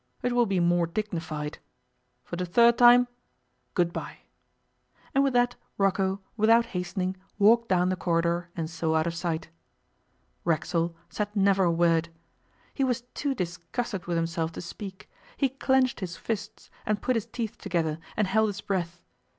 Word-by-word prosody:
It 245 Hz, -, +1 dB
will 240 Hz, -1 st, +3 dB
be 195 Hz, -2 st, +1 dB
more 175 Hz, 0 st, +3 dB
dignified. 165 Hz, -6 st, -4 dB, 0.6 s
For -, -, -6 dB
the 180 Hz, +1 st, -3 dB
third 235 Hz, +6 st, +5 dB
time, 245 Hz, 0 st, +7 dB, 0.7 s
good 170 Hz, -1 st, +2 dB
bye.' -, -, -6 dB, 0.9 s
And 275 Hz, -, +4 dB
with 275 Hz, -2 st, +1 dB
that 245 Hz, 0 st, +3 dB, 0.2 s
Rocco, 195 Hz, 0 st, +1 dB
without 230 Hz, +1 st, +5 dB
hastening, 180 Hz, +1 st, -2 dB, 0.2 s
walked 230 Hz, +3 st, +5 dB
down 180 Hz, -1 st, +3 dB
the 185 Hz, -, +1 dB
corridor 170 Hz, 0 st, 0 dB
and 165 Hz, -2 st, -2 dB
so 160 Hz, -1 st, -1 dB
out 160 Hz, 0 st, +2 dB
of 170 Hz, -, -1 dB
sight. 165 Hz, -1 st, -3 dB, 0.9 s
Racksole 165 Hz, +1 st, 0 dB, 0.2 s
said 210 Hz, 0 st, -3 dB
never 195 Hz, -1 st, +4 dB
a 170 Hz, -, +3 dB
word. 165 Hz, -1 st, +2 dB, 0.6 s
He 275 Hz, -, 0 dB
was 250 Hz, -2 st, +1 dB
too 280 Hz, -2 st, -1 dB
disgusted 180 Hz, +2 st, -4 dB
with 170 Hz, -1 st, 0 dB
himself 165 Hz, 0 st, -1 dB
to -, -, -6 dB
speak. 190 Hz, +2 st, -8 dB, 0.3 s
He 275 Hz, -, +2 dB
clenched 265 Hz, -1 st, +1 dB
his 180 Hz, -3 st, -5 dB
fists, 220 Hz, -2 st, -5 dB
and 210 Hz, 0 st, 0 dB
put 255 Hz, -, +1 dB
his 225 Hz, -, -1 dB
teeth 225 Hz, -3 st, -5 dB
together, 165 Hz, -5 st, -1 dB, 0.2 s
and 210 Hz, -, +3 dB
held 220 Hz, +3 st, +2 dB
his 205 Hz, 0 st, -5 dB
breath. 175 Hz, -3 st, -3 dB
185 Hz, 160 wpm, -27 LUFS, 170-225 Hz, 0.9 s, time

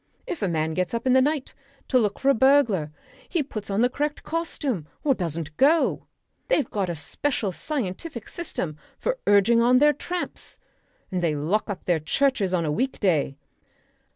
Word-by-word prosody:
If 350 Hz, -, -5 dB
a 200 Hz, -, +1 dB
man 160 Hz, -2 st, 0 dB
gets 185 Hz, +6 st, -1 dB
up 230 Hz, -, -3 dB
in 255 Hz, -, +4 dB
the 260 Hz, -, +6 dB
night 290 Hz, 0 st, 0 dB, 0.4 s
to 255 Hz, -, +4 dB
look 210 Hz, -3 st, 0 dB
for 275 Hz, -, +1 dB
a -, -, +6 dB
burglar 235 Hz, -, +3 dB, 0.4 s
he 335 Hz, -5 st, +1 dB
puts 215 Hz, -7 st, -7 dB
on 200 Hz, +2 st, +1 dB
the 245 Hz, -, +5 dB
correct 290 Hz, +4 st, -3 dB
costume 290 Hz, -, -3 dB, 0.2 s
or 285 Hz, -, +4 dB
doesn't 165 Hz, -, -4 dB
go. 310 Hz, +5 st, +3 dB, 0.4 s
They've 320 Hz, -, +2 dB
got 195 Hz, -3 st, -2 dB
a 170 Hz, -, -2 dB
special 210 Hz, -, -2 dB
scientific 235 Hz, -, -4 dB
system 180 Hz, -, -4 dB, 0.2 s
for -, -, -2 dB
urging 205 Hz, +3 st, +5 dB
on 245 Hz, +2 st, +5 dB
their 295 Hz, +3 st, +5 dB
tramps. 350 Hz, +5 st, -5 dB, 0.5 s
And 185 Hz, -1 st, -1 dB
they 165 Hz, -3 st, +1 dB
lock 170 Hz, +11 st, 0 dB
up 195 Hz, -3 st, -5 dB
their 175 Hz, -3 st, +2 dB
churches 210 Hz, -, +1 dB
on 175 Hz, -3 st, +1 dB
a 150 Hz, -, 0 dB
week 260 Hz, -, -1 dB
day. 155 Hz, -8 st, +1 dB
225 Hz, 180 wpm, -25 LUFS, 180-280 Hz, 0.5 s, the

